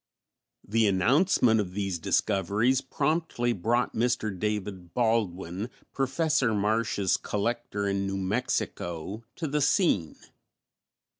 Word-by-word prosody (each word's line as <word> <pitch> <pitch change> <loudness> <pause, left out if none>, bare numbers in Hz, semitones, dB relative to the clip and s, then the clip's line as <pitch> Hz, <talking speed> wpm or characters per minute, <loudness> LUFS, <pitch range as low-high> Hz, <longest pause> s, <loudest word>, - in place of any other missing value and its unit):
The 110 +1 +3
announcement 115 - +3
of 95 -3 -2
these 95 -4 -2
discoveries 105 +9 +1
promptly 145 -5 0
brought 115 +5 0
Mr. 115 -3 0
David 95 -3 -4
Baldwin, 105 -4 0 0.2
Professor 135 -3 +1
Marsh's 105 -2 +1
collector 105 -1 -2
in 100 0 0
New 95 0 -2
Mexico, 95 -2 -2
to 165 - -3
the 150 +1 0
scene. 140 - +2
110 Hz, 100 wpm, -28 LUFS, 95-125 Hz, 0.2 s, The